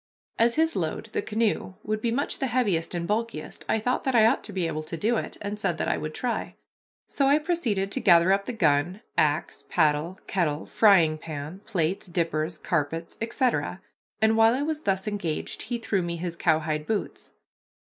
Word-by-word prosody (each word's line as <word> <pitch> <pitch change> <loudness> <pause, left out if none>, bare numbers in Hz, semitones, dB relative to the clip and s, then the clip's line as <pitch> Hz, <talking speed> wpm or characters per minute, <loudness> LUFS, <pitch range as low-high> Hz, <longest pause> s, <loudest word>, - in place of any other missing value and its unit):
As 235 +1 +4
his 320 +1 +2
load, - - -2
the 430 - -1
canoe, 215 - -1
would 215 0 -2
be 235 - 0
much 275 +5 -1
the 270 - 0
heaviest 205 -10 0
and 170 -1 -2
bulkiest, 230 +2 -3
I - - +3
thought 245 +4 -1
that 265 -2 +1
I 220 -2 +7
ought 225 - +3
to - - -8
be 185 -3 -1
able 155 -1 -2
to 160 +2 -6
do 225 +8 +1
it, - - -4
and 205 +1 -4
said - - 0
that - - -1
I - - +2
would - - -5
try. - - -2 0.5
So 275 - +1
I 285 +2 +5
proceeded 265 - -1
to - - -1
gather 170 0 +5
up 200 0 0
the - - -3
gun, 170 0 +1
axe, 150 +1 +1
paddle, 155 +2 +1
kettle, 160 -5 -1
frying 170 -8 +4
pan, 155 +4 -7
plates, 185 -4 -1
dippers, 165 -2 -1
carpets, 160 +3 -2
etc., 230 - 0 0.4
and 220 +1 +4
while 225 +1 +5
I 275 - -1
was 310 0 -2
thus 195 -3 -1
engaged 200 -7 -3
he 240 +1 -3
threw 220 -4 -1
me 170 -1 -3
his 170 0 -4
cowhide 155 -2 0
boots. 215 -2 -3
195 Hz, 195 wpm, -26 LUFS, 165-230 Hz, 0.5 s, I